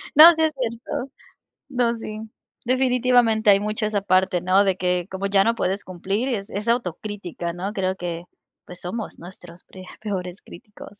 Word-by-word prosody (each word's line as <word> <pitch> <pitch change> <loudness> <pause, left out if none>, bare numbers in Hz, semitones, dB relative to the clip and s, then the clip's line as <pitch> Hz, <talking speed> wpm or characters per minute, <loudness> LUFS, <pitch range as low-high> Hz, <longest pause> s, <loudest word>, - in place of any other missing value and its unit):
No, 325 +3 +10
sí 320 - -1
es 315 -1 +2
cierto. 245 +2 -4 0.6
No, 245 -3 +1
sí, 215 -1 -7 0.5
definitivamente 245 -3 +3
hay 200 0 +7
mucho 215 +1 -2
esa 210 -1 0
parte, 185 -2 +2
¿no?, 185 +3 +4
de 190 -2 +1
que 180 0 0
como 190 +1 -3
ya 195 0 +4
no 230 +2 +1
puedes 195 -1 -1
cumplir 195 +7 -2
es 200 -6 -3
es 210 +3 -5
autocrítica, 195 -5 -2
¿no?, 190 +4 -4
creo 190 -1 -1
que 175 -2 -5 0.4
pues, 180 0 -9
somos 215 +5 -5
nuestros 175 0 -12
pre 185 -1 -13 0.2
peores 190 -3 -4
críticos. 210 -3 -13
200 Hz, 170 wpm, -23 LUFS, 185-235 Hz, 0.6 s, No